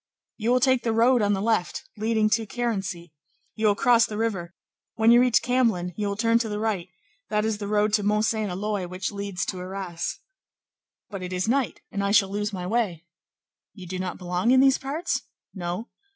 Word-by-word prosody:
"You 225 +1 -1
will 250 +1 +4
take 260 -1 +3
the 230 -1 0
road 240 +2 +4
on 205 0 +2
the 195 - -1
left, 220 -5 0
leading 220 0 +1
to 220 0 +1
Carency; 200 -8 -3 0.4
you 220 -1 +1
will 205 - +4
cross 235 +2 +4
the 210 - -6
river; 190 -6 -2 0.4
when 225 +1 +4
you 240 +1 +7
reach 250 -2 +3
Camblin, 230 -8 +1
you 210 -1 -2
will 200 - -2
turn 230 +2 +3
to 230 -2 -2
the 210 - -3
right; 210 -5 -2 0.4
that 210 0 +1
is 220 -1 -1
the 205 - -4
road 210 0 +1
to 215 - +3
Mont 210 +1 +2
Saint 220 -3 -1
Éloy 195 -1 -3
which 185 0 -3
leads 200 -2 -3
to 185 - -4
Arras." 185 -2 -4 0.9
"But 195 -2 -5
it 180 0 -5
is 185 +1 -1
night, 260 0 0
and 200 - -2
I 200 - +1
shall 200 -1 +4
lose 205 +1 -2
my 180 -3 -5
way." 185 -6 -1 0.7
"You 190 -3 -10
do 185 +1 -5
not 185 -1 -4
belong 180 +4 -1
in 260 +1 +6
these 270 0 +5
parts?" 285 +6 -2 0.3
"No." 180 +3 -4
210 Hz, 210 wpm, -25 LUFS, 185-230 Hz, 0.9 s, you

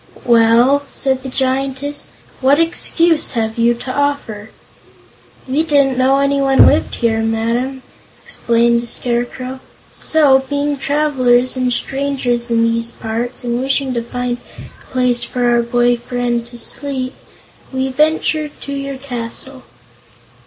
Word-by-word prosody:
"Well," 235 +4 +4
said 265 -1 -1
the 265 - -6
Giantess, 270 +2 -2 0.3
"what 275 +2 +4
excuse 330 -1 +2
have 225 -1 -2
you 235 +1 +3
to 255 +2 -6
offer?" 280 -7 -2 1.0
"We 270 +4 +1
didn't 285 -4 +2
know 260 +2 +3
anyone 275 -1 +4
lived - - +2
here, 225 -2 0
Madam," 230 +4 -1 0.4
explained 235 0 +1
the 240 - -8
Scarecrow; 245 +2 -3 0.4
"so, 290 -4 +4
being 285 0 0
travelers 265 -3 +2
and 255 -1 0
strangers 260 -2 -1
in 230 -1 +2
these 230 0 0
parts, 230 +2 -5
and 240 0 -1
wishing 270 0 0
to 235 - -1
find 245 +1 -3 0.2
a - - -15
place 250 -2 +1
for 245 -1 -1
our 240 0 +3
boy 240 +1 +2
friend 240 0 -2
to 240 0 -11
sleep, 260 +1 -3 0.6
we 265 0 -1
ventured 305 +1 0
to 280 - -7
enter 275 - -3
your 275 - -5
castle." 260 0 -6
255 Hz, 135 wpm, -17 LUFS, 235-275 Hz, 1.0 s, Well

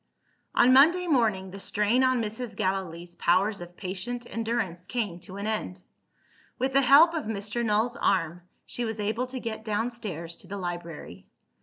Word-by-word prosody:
On 255 +1 +6
Monday 335 +7 +6
morning, 220 - +1
the 195 - -8
strain 210 +6 +1
on 255 -2 +2
Mrs. 225 +2 -5
Gallilee's 175 -2 -2
powers 195 +3 +2
of 175 0 -10
patient 205 +6 -5
endurance 220 -6 -3
came 205 -6 -2
to 185 +2 -10
an 200 - -4
end. 210 -4 -3 0.7
With 265 +1 -1
the 275 - +5
help 285 +6 +7
of 320 -3 -2
Mr. 215 +2 -3
Null's 225 +2 +1
arm, 175 -2 +1 0.2
she 245 - -3
was 225 -1 -3
able 220 +5 -1
to 255 0 -5
get 220 -2 -5
downstairs 210 -7 -3
to 185 - -15
the 200 +3 -5
library. 170 - -6
210 Hz, 165 wpm, -27 LUFS, 185-245 Hz, 0.7 s, help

